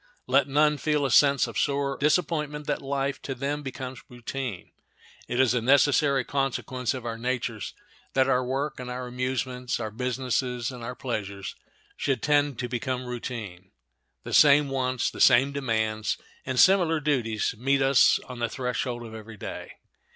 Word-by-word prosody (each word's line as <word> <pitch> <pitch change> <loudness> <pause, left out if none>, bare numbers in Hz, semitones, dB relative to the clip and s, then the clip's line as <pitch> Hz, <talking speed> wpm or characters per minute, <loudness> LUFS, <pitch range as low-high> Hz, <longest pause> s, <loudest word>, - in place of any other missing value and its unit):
Let 135 +1 +3
none 150 +1 +3
feel 150 -2 +1
a 135 - -1
sense 140 +5 +5
of - - -4
sore 140 -1 0
disappointment 150 -1 0
that 145 - -2
life 135 -1 -2
to 135 - -5
them 140 +3 -2
becomes 130 -2 -6
routine. 120 -4 -6 0.6
It 120 - -2
is 130 -3 +4
a 125 - +1
necessary 140 +1 +4
consequence 135 -2 -2
of 125 -2 -7
our 115 -1 -4
natures 120 -4 -3 0.4
that 130 0 +3
our 130 -1 +2
work 135 +4 -2
and 125 -1 -6
our 125 0 -4
amusements, 125 0 -2
our 110 -2 -4
business 125 +2 -1
and 125 -1 -4
our 125 +2 -5
pleasures, 100 -6 -5 0.4
should 135 -5 -1
tend 145 -3 +2
to 125 - -3
become 125 +1 -3
routine. 110 -7 -6 0.5
The - - -6
same 145 -1 +6
wants, 130 -2 -1
the - - -6
same 135 +2 +6
demands, 110 -6 -1 0.3
and 130 -1 -1
similar 175 -4 +5
duties 125 -9 0
meet 135 +4 +1
us 135 -1 +5
on 125 -1 -8
the 120 -1 0
threshold 125 -1 -3
of 110 - -10
every 110 0 -10
day. - - -7
130 Hz, 165 wpm, -26 LUFS, 120-140 Hz, 0.6 s, same